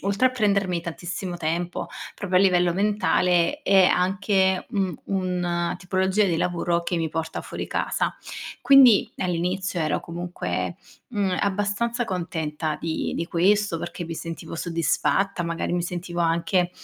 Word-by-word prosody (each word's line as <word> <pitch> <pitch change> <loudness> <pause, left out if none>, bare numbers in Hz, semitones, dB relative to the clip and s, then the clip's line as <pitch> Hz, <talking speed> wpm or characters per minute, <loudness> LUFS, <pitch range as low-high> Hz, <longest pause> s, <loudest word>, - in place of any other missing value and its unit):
oltre 200 +6 +3
a - - -7
prendermi 200 -7 +1
tantissimo 175 +2 -5
tempo 170 +2 -2 0.3
proprio 185 -2 +1
a - - +5
livello 180 -2 +3
mentale, 200 - +2
è 195 -4 +5
anche 190 +1 +2
un 190 -5 0 0.3
un 175 -1 -1
tipologia 190 +2 +1
di 170 -4 +1
lavoro 175 0 0
che 175 - -1
mi 165 -1 0
porta 160 0 -2
fuori - - -6
casa. - - -1 0.5
Quindi, 265 -6 +7
all'inizio, 180 +1 -1
ero 155 -1 0
comunque, 175 +1 -4 0.3
mhmm, 200 -6 0
abbastanza 205 +4 0
contenta 160 -5 -3
di 160 -1 -2
di 165 - -2
questo, 195 +1 +2
perché 175 +1 -5
mi 165 0 -5
sentivo 165 0 -6
soddisfatta, 170 +3 0
magari 170 0 -2
mi 175 0 0
sentivo 175 0 -4
anche 170 +2 +1
180 Hz, 140 wpm, -24 LUFS, 170-195 Hz, 0.5 s, Quindi